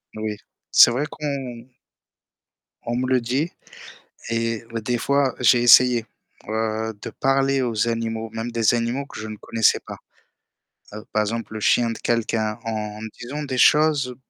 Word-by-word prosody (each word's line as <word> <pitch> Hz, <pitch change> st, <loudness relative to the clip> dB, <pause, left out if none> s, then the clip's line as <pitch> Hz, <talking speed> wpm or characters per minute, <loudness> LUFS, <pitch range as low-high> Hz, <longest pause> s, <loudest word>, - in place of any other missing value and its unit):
Oui, 110 Hz, -1 st, -4 dB, 0.3 s
c'est 120 Hz, -, +8 dB
vrai 130 Hz, +5 st, -1 dB
qu'on 130 Hz, -5 st, -5 dB, 1.2 s
On 120 Hz, +1 st, -2 dB
me 125 Hz, -, -1 dB
le 130 Hz, -1 st, +3 dB
dit 135 Hz, +8 st, -1 dB, 0.8 s
et 115 Hz, -1 st, -1 dB, 0.2 s
des 120 Hz, +2 st, -1 dB
fois 140 Hz, 0 st, +1 dB
j'ai 120 Hz, 0 st, +4 dB
essayé, 120 Hz, -1 st, +6 dB, 0.4 s
heu, 110 Hz, 0 st, -2 dB
de -, -, -6 dB
parler 135 Hz, 0 st, +1 dB
aux 115 Hz, -2 st, 0 dB
animaux, 115 Hz, -1 st, -3 dB
même 115 Hz, +1 st, -4 dB
des 115 Hz, 0 st, +2 dB
animaux 120 Hz, +4 st, -1 dB
que -, -, -10 dB
je 110 Hz, -, -6 dB
ne 110 Hz, -1 st, -7 dB
connaissais 115 Hz, +1 st, +2 dB
pas. -, -, -8 dB, 1.0 s
Heu, 105 Hz, 0 st, -8 dB
par 110 Hz, -, +2 dB
exemple, 110 Hz, +1 st, -4 dB
le 110 Hz, -, -5 dB
chien 115 Hz, +2 st, +3 dB
de 115 Hz, -, -5 dB
quelqu'un 110 Hz, -1 st, -1 dB
en 105 Hz, -1 st, -4 dB, 0.2 s
disant 140 Hz, +5 st, -5 dB
des 130 Hz, -2 st, -4 dB
choses 145 Hz, -2 st, +4 dB
115 Hz, 155 wpm, -22 LUFS, 110-130 Hz, 1.2 s, c'est